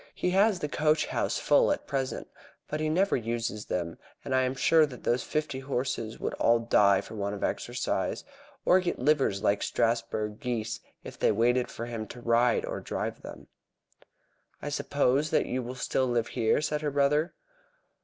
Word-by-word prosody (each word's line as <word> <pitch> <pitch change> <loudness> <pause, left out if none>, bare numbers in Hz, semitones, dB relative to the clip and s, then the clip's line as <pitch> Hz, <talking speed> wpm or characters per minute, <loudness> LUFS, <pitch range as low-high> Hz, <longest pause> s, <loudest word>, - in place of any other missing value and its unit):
He 180 - 0
has 200 +2 +4
the 175 - -3
coach 150 +1 +2
house - - -1
full - - +4
at - - -2
present, 135 -2 -3 0.4
but 150 - -3
he 155 0 0
never 190 +5 +2
uses 115 -2 -3
them, 85 -2 -3 0.3
and 135 - -2
I 130 - +4
am 130 +1 0
sure 155 +4 +4
that 125 -3 -11
those 120 +1 +1
fifty 150 -3 -2
horses 130 -4 -3
would - - -2
all 115 - +5
die 100 -4 +4
for - - -11
want 100 -1 -3
of 100 - -6
exercise, - - -2 0.4
or 185 - +6
get 180 -1 -2
livers 130 -8 +1
like 100 0 +2
Strasburg 110 -2 -1
geese, 120 -5 -3 0.2
if - - -10
they - - +3
waited 120 +3 +2
for 115 - -6
him 115 -2 -5
to 120 - -10
ride 120 0 +2
or - - -4
drive - - -4
them." - - -10 1.1
"I 145 - -5
suppose 145 0 +1
that - - +2
you 130 - -2
will 125 +1 -6
still 130 0 0
live 120 -2 0
here?" 115 +3 +1
said 150 0 -1
her 150 - 0
brother. 145 +4 +1
125 Hz, 185 wpm, -28 LUFS, 115-150 Hz, 1.1 s, or